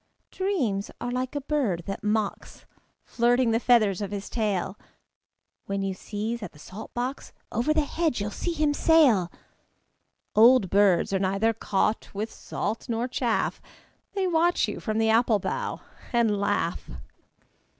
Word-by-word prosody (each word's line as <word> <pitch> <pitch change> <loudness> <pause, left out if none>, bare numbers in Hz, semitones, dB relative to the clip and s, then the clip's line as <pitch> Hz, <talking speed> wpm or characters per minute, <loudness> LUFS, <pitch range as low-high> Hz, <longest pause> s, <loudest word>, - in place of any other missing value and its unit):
Dreams 270 - -1
are 245 - -3
like 255 +2 -3
a 285 - -1
bird 265 - -1
that 195 - -5
mocks, 210 -1 -2 0.4
Flirting 240 0 +2
the 225 - +2
feathers 215 -6 +3
of 200 - -3
his 200 -1 -6
tail. 205 -4 -1 0.9
When 200 0 -2
you 195 -1 -1
sieze 220 +4 -4
at 205 - -7
the - - -17
salt 185 +8 -10
box, 250 +3 -4 0.2
Over 240 +7 0
the 310 -1 +2
hedge 320 -5 -1
you'll 205 +1 -3
see 345 - -3
him 300 -2 +1
sail. 275 - +4 1.0
Old 230 -3 +6
birds 195 -2 +3
are 195 - +2
neither 195 +4 +1
caught 215 0 -1
with 215 +3 -3
salt 225 +3 -4
nor 230 +1 -1
chaff: 245 -2 -1 0.5
They 390 -1 0
watch 345 0 +2
you - - -5
from 215 -2 -2
the 225 0 +3
apple 225 -1 +4
bough 200 - -3 0.3
and 235 -3 +2
laugh. 200 0 -1
225 Hz, 150 wpm, -26 LUFS, 200-255 Hz, 1.0 s, Old